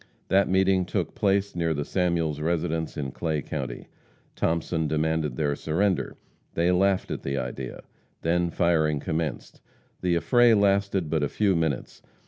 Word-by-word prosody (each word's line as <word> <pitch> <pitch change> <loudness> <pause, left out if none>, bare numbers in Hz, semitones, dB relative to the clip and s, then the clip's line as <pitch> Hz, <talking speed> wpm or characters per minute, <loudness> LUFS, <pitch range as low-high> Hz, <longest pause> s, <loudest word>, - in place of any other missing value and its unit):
That 100 +1 +3
meeting 95 0 +3
took 90 - -2
place 100 0 +1
near 85 -2 0
the 75 0 -2
Samuels 85 -5 0
residence 80 0 -1
in 70 -3 -3
Clay 80 -2 -2
county. 65 -5 -5 0.5
Thomason 80 -1 0
demanded 80 -2 0
their 70 0 0
surrender. 90 +6 0 0.4
They 85 +2 +2
laughed 95 +1 +2
at - - -3
the 70 0 -2
idea. 65 0 -5 0.4
Then 85 +1 +1
firing 80 -4 +2
commenced. 80 +2 -4 0.4
The 90 -2 +1
affray 120 +6 +5
lasted 100 -4 +2
but 80 -2 +1
a 75 - 0
few 100 -3 +1
minutes. 80 -5 -2
85 Hz, 145 wpm, -26 LUFS, 75-95 Hz, 0.5 s, affray